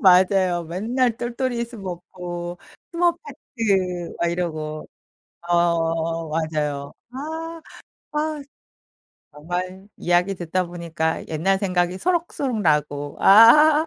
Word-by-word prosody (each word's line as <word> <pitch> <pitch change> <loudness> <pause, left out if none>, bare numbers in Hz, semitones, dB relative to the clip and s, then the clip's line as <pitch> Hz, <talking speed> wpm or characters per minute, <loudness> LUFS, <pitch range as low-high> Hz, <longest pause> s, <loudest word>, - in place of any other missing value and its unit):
맞아요. 185 -2 +4
맨날 225 +8 0
똘똘이 240 0 -2
스머프, 180 -5 -7 0.3
스머페티 230 - -1
막 170 - +1
이러고 155 -3 -4 0.6
어 165 -1 +1
맞아요. 150 -3 -2 0.2
아. 320 +5 -6 0.5
아. 305 0 -2 0.9
정말 180 +6 -5
이야기 180 +3 +1
듣다 180 +1 -1
보니까 170 -2 -3
옛날 175 +5 +1
생각이 180 -1 0
소록소록 320 - -1
나고 150 -3 0
아. 295 +10 +7
180 Hz, 205 characters per minute, -23 LUFS, 165-235 Hz, 0.9 s, 아